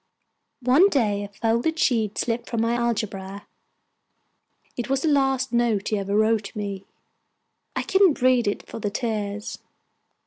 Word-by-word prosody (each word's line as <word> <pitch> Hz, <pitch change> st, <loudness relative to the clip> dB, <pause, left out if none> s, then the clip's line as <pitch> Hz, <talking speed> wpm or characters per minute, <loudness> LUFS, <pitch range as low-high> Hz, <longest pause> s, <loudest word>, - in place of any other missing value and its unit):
One 280 Hz, +11 st, +5 dB
day 210 Hz, -, +1 dB
a -, -, -5 dB
folded 230 Hz, +9 st, -1 dB
sheet 225 Hz, -8 st, +1 dB
slipped 235 Hz, 0 st, -2 dB
from 230 Hz, -, -2 dB
my 230 Hz, +1 st, +1 dB
algebra; 205 Hz, -4 st, -3 dB, 1.3 s
it 240 Hz, -, -4 dB
was 270 Hz, 0 st, 0 dB
the -, -, +1 dB
last 270 Hz, -3 st, +1 dB
note 235 Hz, -4 st, +1 dB
he 215 Hz, -, 0 dB
ever 200 Hz, +1 st, -2 dB
wrote 215 Hz, -1 st, +1 dB
me. 200 Hz, -2 st, -5 dB, 0.9 s
I -, -, -1 dB
couldn't 385 Hz, -5 st, +3 dB
read 255 Hz, -3 st, +4 dB
it 205 Hz, -, -2 dB
for -, -, -7 dB
the 205 Hz, -, -2 dB
tears. 210 Hz, -2 st, -3 dB
230 Hz, 145 wpm, -24 LUFS, 205-255 Hz, 1.3 s, One